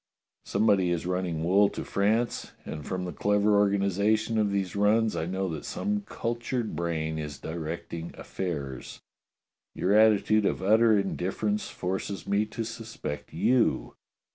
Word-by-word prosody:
Somebody 100 -3 +3
is 85 -1 -1
running 90 -3 -1
wool 100 +4 +4
to - - -5
France, 110 +4 0
and 75 -1 -6
from 90 +2 -3
the 90 - -5
clever 105 0 +2
organization 100 +2 +2
of 105 -1 +2
these 100 -2 -1
runs, 105 +2 +3
I 80 - -2
know 95 +1 -1
that 80 -3 -5
some 210 0 -2
cultured 120 0 -3
brain 80 -2 -2
is 75 -2 -5
directing 80 +1 -5
affairs. 70 -9 -5 0.7
Your 95 +3 +1
attitude 110 -1 +5
of - - -2
utter 110 +2 +5
indifference 100 +2 -1
forces 95 0 -4
me 105 +2 +1
to 115 +2 -4
suspect 115 -9 -6
you. 125 -2 +2
100 Hz, 140 wpm, -28 LUFS, 85-110 Hz, 0.7 s, attitude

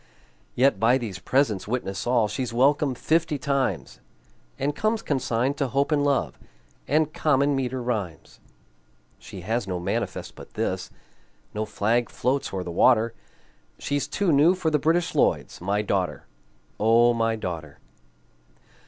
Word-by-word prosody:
Yet 125 -5 +3
by 120 +4 +4
these 105 -8 -6
presents 110 -3 0
witness 105 -4 -3
all 120 -3 +3
She's 125 +2 -3
welcome 135 +2 +2
fifty 160 +2 +1
times, 140 0 -2 0.6
And 140 +2 -1
comes 215 0 0
consigned 130 -1 0
to 140 - 0
Hope 140 +4 0
and 145 -1 +2
Love 135 - 0 0.5
And 155 +1 +1
common 140 -1 +2
meter 130 -1 -2
rhymes. 105 -9 -4 0.8
She 100 -3 -10
has 110 +3 -2
no 90 -2 -2
manifest 85 - -3
but - - -14
this, - - -2 0.6
No 110 +1 -2
flag 115 +3 0
floats 135 +3 -1
o'er 95 -2 -3
the 90 - -6
water, 115 +5 +3 0.6
She's 145 -1 -2
too 185 +4 0
new 155 +6 +5
for 170 -4 -1
the 150 - +2
British 165 +4 +1
Lloyds - - 0
My 100 +3 0
daughter, 95 -3 -2 0.5
O 115 +2 +5
my 115 -1 0
daughter! 85 -8 -6
125 Hz, 145 wpm, -25 LUFS, 105-145 Hz, 0.8 s, new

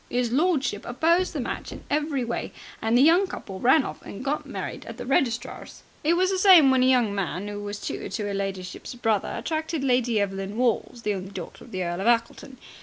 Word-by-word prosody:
His 245 -1 0
lordship 275 - +1
opposed 335 +9 +2
the 305 - -4
match 245 - -4
in - - -9
every 295 -3 0
way, 235 - -4 0.3
and 225 +2 +2
the 255 - +6
young 345 +6 +5
couple 190 - -7
ran 265 +6 +5
off - - -7
and 215 +7 -9
got 290 +2 -2
married - - -5
at - - -8
a - - -5
registrar's. 245 -3 -1 0.2
It 325 +3 +3
was 370 +2 +2
the 380 - 0
same 360 -8 +8
when 260 -1 +3
a 255 - +4
young 245 -5 +3
man 195 0 -3
who 205 0 -5
was 205 0 -5
tutor - - -5
to 215 - -3
'er 200 - -3
ladyship's 195 +2 -5
brother 225 -4 0
attracted 315 -2 -2
Lady 245 -4 +2
Evelyn 195 +1 -3
Walls, 240 -1 0
the 210 - 0
only 190 -1 -5
daughter 185 -4 -8
of - - -14
the 185 -1 -2
Earl 175 +1 -3
of 205 - -1
Ackleton. 240 +3 0
245 Hz, 220 wpm, -25 LUFS, 205-295 Hz, 0.3 s, same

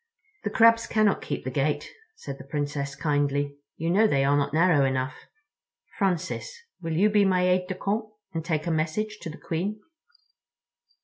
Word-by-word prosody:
"The - - -1
Crabs 230 -1 +5
cannot 215 -2 +2
keep - - -4
the 130 - -4
gate," 145 +3 0 0.3
said 140 - -8
the - - -8
Princess 145 -1 -3
kindly. 145 -2 0 0.2
"You 165 +1 -1
know 215 +4 +5
they 140 -9 +2
are 140 +1 +3
not 145 0 +1
narrow 160 -2 +4
enough. 130 0 -2 0.7
Francis, 195 - -1 0.2
will 165 -2 -3
you 190 +6 +4
be 210 -1 +4
my 185 -2 +3
aide 180 0 +2
de 185 - -3
camp 205 +4 -1 0.3
and 165 -1 -2
take 155 -2 -1
a 170 - 0
message 190 +8 -1
to - - -5
the 155 - -8
Queen?" 195 +6 -3
165 Hz, 175 wpm, -26 LUFS, 145-200 Hz, 0.7 s, Crabs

